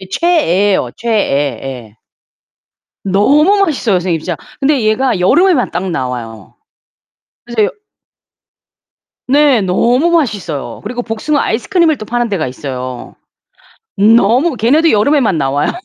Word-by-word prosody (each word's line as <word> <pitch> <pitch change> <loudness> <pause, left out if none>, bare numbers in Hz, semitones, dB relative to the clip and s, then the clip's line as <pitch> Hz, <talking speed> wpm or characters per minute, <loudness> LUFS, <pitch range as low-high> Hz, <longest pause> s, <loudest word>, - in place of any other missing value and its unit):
이 190 - -11
최애예요 205 - +1
최애. 145 - -1
예. 120 -5 -8 1.1
너무 205 +10 +3 0.2
맛있어요 255 - -1
선생님 175 -2 -1
진짜. 175 -1 -4 0.2
근데 275 -2 +1
얘가 220 0 0
여름에만 300 - +2
딱 180 +2 -3
나와요. 120 - -6 0.9
그래서 235 -3 0
여 420 - -35 1.5
네 280 -4 +3
너무 240 - +1
맛있어요. 200 - -2
그리고 245 +3 -4
복숭아 240 +6 -2
아이스크림을 315 - +1
또 215 - -8
파는 240 +1 -1
데가 175 -9 -2
있어요. 130 -1 -7 0.8
너무 230 +8 +3
걔네도 295 +9 +2
여름에만 215 - +2
나와요. 140 +1 0
215 Hz, 280 characters per minute, -14 LUFS, 165-270 Hz, 1.5 s, 너무